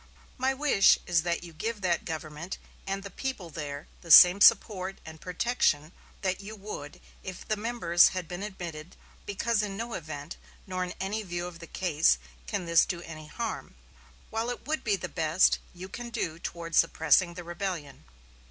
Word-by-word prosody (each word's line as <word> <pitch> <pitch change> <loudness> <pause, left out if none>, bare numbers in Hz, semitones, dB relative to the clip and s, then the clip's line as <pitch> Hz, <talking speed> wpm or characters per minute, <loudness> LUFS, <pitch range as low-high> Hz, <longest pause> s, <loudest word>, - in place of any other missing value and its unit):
My 260 +1 +2
wish 270 -7 +5
is 170 -2 +3
that 170 0 -1
you 170 -2 -10
give 215 +7 -4
that 180 -3 0
government 155 +1 -5 0.3
and 195 0 -2
the 200 - -8
people 205 -8 -5
there 145 -1 -6
the 170 - -12
same 180 +4 +10
support 190 -2 +5
and 160 -1 -10
protection 180 -5 +1 0.3
that 190 0 0
you 210 +2 -8
would 195 -8 -8 0.2
if 185 -2 -8
the 215 - +1
members 210 -6 +4
had 185 -3 -3
been 175 +3 -6
admitted, 175 -6 -7 0.3
because 215 +2 +1
in 200 -2 -4
no 230 +2 -4
event, 150 0 -6 0.3
nor 185 -1 -2
in 180 - -5
any 205 +3 -2
view 175 -3 -4
of 175 -2 -8
the 170 - -10
case, 165 -3 +2 0.3
can 200 -4 -2
this 170 -1 +5
do 175 -2 -4
any 155 -2 -9
harm, 230 +7 -5 0.6
while 225 +2 -1
it 245 - -5
will 310 +3 0
be 210 -8 0
the - - -5
best 165 +1 +3
you 185 +1 -9
can 240 +5 -7
do 170 -8 -3
toward 170 -1 -6
suppressing 170 +2 +4
the 175 - -7
rebellion." 175 -4 -5
180 Hz, 180 wpm, -29 LUFS, 165-205 Hz, 0.6 s, same